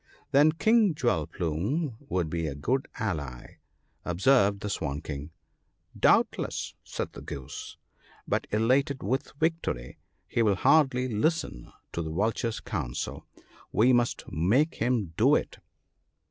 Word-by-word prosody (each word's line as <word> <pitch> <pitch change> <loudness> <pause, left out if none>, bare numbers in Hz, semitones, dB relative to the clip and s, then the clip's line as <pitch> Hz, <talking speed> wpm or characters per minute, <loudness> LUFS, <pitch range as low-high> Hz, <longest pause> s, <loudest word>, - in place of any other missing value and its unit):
'Then 145 +3 +6
King 215 0 +3
Jewel 120 - +1
plume 105 - -2
would 90 -3 0
be 85 0 -2
a 70 - -4
good 130 - -1
ally/ 75 - -4 0.4
observed 100 +2 +3
the 105 - -3
Swan 70 -6 -2
king. 75 -1 -6 0.4
' - - -22
Doubtless! - - +1
' - - -49
said - - -5
the - - -9
Goose, 70 -4 -7 0.2
' - - -28
but - - 0
elated 130 +6 +1
with 130 +7 -1
victory, 160 - -1 0.3
he 120 - 0
will 105 -3 +3
hardly 130 - +3
listen 120 - -1 0.2
to 85 - -3
the 80 - -4
Vulture's 110 +6 -1
counsel; 75 - -4 0.4
we 125 +4 +4
must 120 -1 +1
make 115 - +2
him 115 -9 0
do - - +5
it.' - - -2
110 Hz, 140 wpm, -28 LUFS, 80-135 Hz, 0.4 s, Then